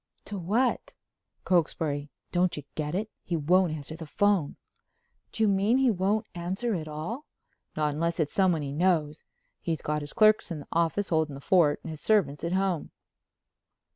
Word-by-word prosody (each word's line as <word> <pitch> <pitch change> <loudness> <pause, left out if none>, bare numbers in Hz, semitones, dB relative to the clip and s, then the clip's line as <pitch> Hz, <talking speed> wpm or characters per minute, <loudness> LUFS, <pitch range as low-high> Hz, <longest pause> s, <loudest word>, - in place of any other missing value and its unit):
"To 205 - -5
what?" 225 +9 0 0.5
"Cokesbury. 150 -4 0 0.2
Don't 180 -1 +1
you 150 - -5
get 150 +1 -3
it? 215 +3 -2
He 175 - -3
won't 175 +3 +3
answer 155 0 -6
the 160 -1 -8
phone." 200 -3 +1 0.8
"Do 225 - -1
you - - +5
mean 200 +5 +3
he 265 -2 +4
won't 200 +2 0
answer 190 +7 -2
at 160 -5 -3
all?" 160 - -5 0.5
"Not 150 -1 +1
unless 170 +3 -1
it's 150 -2 0
someone 180 -6 +2
he 140 -1 -4
knows. 160 -2 +1 0.4
He's 165 -2 -3
got 150 0 -1
his 145 0 -7
clerks 215 -2 +4
in 160 -4 -5
the - - -13
office 170 +4 +1
holding 160 -3 +1
the - - -8
fort 155 -1 +3
and 165 - -6
his 155 - -8
servants 195 -10 +2
at 170 +1 -1
home." 190 -4 0
170 Hz, 175 wpm, -28 LUFS, 150-195 Hz, 0.8 s, you